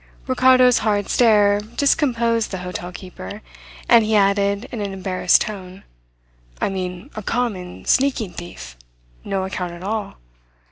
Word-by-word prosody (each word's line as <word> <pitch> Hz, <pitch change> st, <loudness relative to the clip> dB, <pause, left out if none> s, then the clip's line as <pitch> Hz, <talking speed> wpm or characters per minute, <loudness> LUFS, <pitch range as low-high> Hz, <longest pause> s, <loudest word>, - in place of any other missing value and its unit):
Ricardo's 255 Hz, -1 st, +5 dB
hard 205 Hz, -2 st, 0 dB
stare 205 Hz, -4 st, +4 dB
discomposed 235 Hz, -1 st, +1 dB
the 190 Hz, -, -4 dB
hotel 180 Hz, 0 st, -5 dB
keeper, 180 Hz, -, -9 dB, 0.4 s
and 230 Hz, -1 st, +6 dB
he 215 Hz, 0 st, +1 dB
added 200 Hz, +2 st, +2 dB
in 230 Hz, -, -4 dB
an 200 Hz, -1 st, -3 dB
embarrassed 185 Hz, -1 st, +2 dB
tone: 190 Hz, -2 st, -6 dB, 0.8 s
"I -, -, 0 dB
mean 185 Hz, +5 st, -5 dB
a 215 Hz, -, -5 dB
common, 205 Hz, -5 st, -3 dB
sneaking 255 Hz, -8 st, +1 dB
thief 115 Hz, -, -9 dB, 0.5 s
no 195 Hz, -1 st, -2 dB
account 180 Hz, -2 st, -4 dB
at 175 Hz, +1 st, -10 dB
all. 210 Hz, 0 st, -4 dB
205 Hz, 135 wpm, -21 LUFS, 185-230 Hz, 0.8 s, and